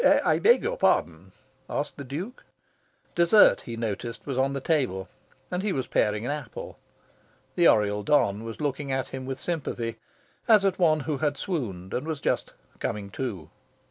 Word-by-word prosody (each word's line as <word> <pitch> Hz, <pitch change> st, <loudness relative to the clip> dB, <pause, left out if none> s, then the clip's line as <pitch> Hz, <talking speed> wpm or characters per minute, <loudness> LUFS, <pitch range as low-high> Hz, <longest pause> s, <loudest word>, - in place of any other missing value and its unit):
"I -, -, +3 dB
beg 470 Hz, +4 st, +5 dB
your -, -, -1 dB
pardon?" -, -, +1 dB, 0.4 s
asked 145 Hz, -, -2 dB
the 140 Hz, -, -7 dB
Duke. 165 Hz, -, -6 dB, 0.7 s
Dessert, 175 Hz, +5 st, +6 dB
he 115 Hz, -1 st, -6 dB
noticed, 115 Hz, +1 st, -4 dB
was 140 Hz, -, -3 dB
on 135 Hz, +2 st, +1 dB
the 140 Hz, -, -2 dB
table, 130 Hz, -, 0 dB, 0.4 s
and 180 Hz, 0 st, -1 dB
he 205 Hz, 0 st, 0 dB
was 130 Hz, -7 st, -1 dB
paring 105 Hz, +2 st, +1 dB
an 140 Hz, -, -1 dB
apple. 145 Hz, -5 st, -7 dB, 0.7 s
The 170 Hz, -1 st, +4 dB
Oriel 105 Hz, -1 st, +3 dB
don 105 Hz, -3 st, +2 dB
was 115 Hz, 0 st, -7 dB
looking 145 Hz, -1 st, -2 dB
at 130 Hz, 0 st, -1 dB
him 130 Hz, -1 st, -6 dB
with 135 Hz, -1 st, -4 dB
sympathy, 135 Hz, -9 st, -3 dB, 0.5 s
as 215 Hz, -3 st, +6 dB
at 190 Hz, -1 st, +1 dB
one 155 Hz, -4 st, +4 dB
who 150 Hz, 0 st, -2 dB
had 145 Hz, -2 st, 0 dB
swooned 100 Hz, -, -4 dB
and 145 Hz, -, -2 dB
was 160 Hz, -3 st, -2 dB
just -, -, -1 dB, 0.3 s
"coming 100 Hz, -1 st, -3 dB
to." 100 Hz, -, -5 dB
135 Hz, 175 wpm, -27 LUFS, 115-160 Hz, 0.7 s, Dessert